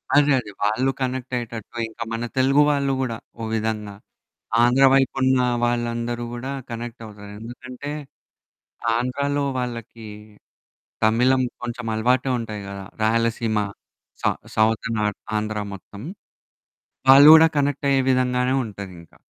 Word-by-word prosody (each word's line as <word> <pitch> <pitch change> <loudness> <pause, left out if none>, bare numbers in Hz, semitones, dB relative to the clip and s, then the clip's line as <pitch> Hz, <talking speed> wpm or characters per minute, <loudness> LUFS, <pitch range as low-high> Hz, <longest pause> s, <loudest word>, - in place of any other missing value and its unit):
అదే 145 0 +5
అదే. 105 - -8
వాళ్ళు 110 +6 +2
కనెక్ట్ 130 0 -3
అయ్యేటట్టు 120 -1 -6
ఇంకా 110 - -6
మన 115 +1 -3
తెలుగు 135 +3 +4
వాళ్ళు 140 -1 +1
కూడా 115 -3 -2 0.2
ఒక 115 - -3
విధంగా 105 -2 -2 0.7
ఆంధ్ర 125 +3 +4
వైపున్న 130 -1 +3 0.2
వాళ్ళందరూ 120 0 -1
గూడా 130 +3 -5 0.2
కనెక్ట్ 115 0 -6
అవుతారు. 105 -1 -11
ఎందుకంటే 125 +4 -8 1.0
ఆంధ్రాలో 140 +4 -1 0.2
వాళ్ళకి 115 -2 -6 1.0
తమిళం 125 +4 +3 0.2
కొంచెం 120 0 -5
అలవాటే 125 +4 +1
ఉంటాయి 110 -3 -5
గదా! 100 0 -7 0.2
రాయలసీమ, 115 0 +1 0.6
సౌ - - +3 0.3
సౌత్ 110 +1 +2
నార్త్ 105 -1 -1 0.2
ఆంధ్ర 105 0 -3 0.2
మొత్తం 100 +2 -11 1.1
వాళ్ళు 140 +3 +10
గూడా 160 0 +9
కనెక్ట్ 145 0 0
అయ్యే 135 -1 +4
విధంగానే 125 0 +1
ఉంటదింకా. 95 -6 -10
120 Hz, 120 wpm, -23 LUFS, 110-130 Hz, 1.1 s, వాళ్ళు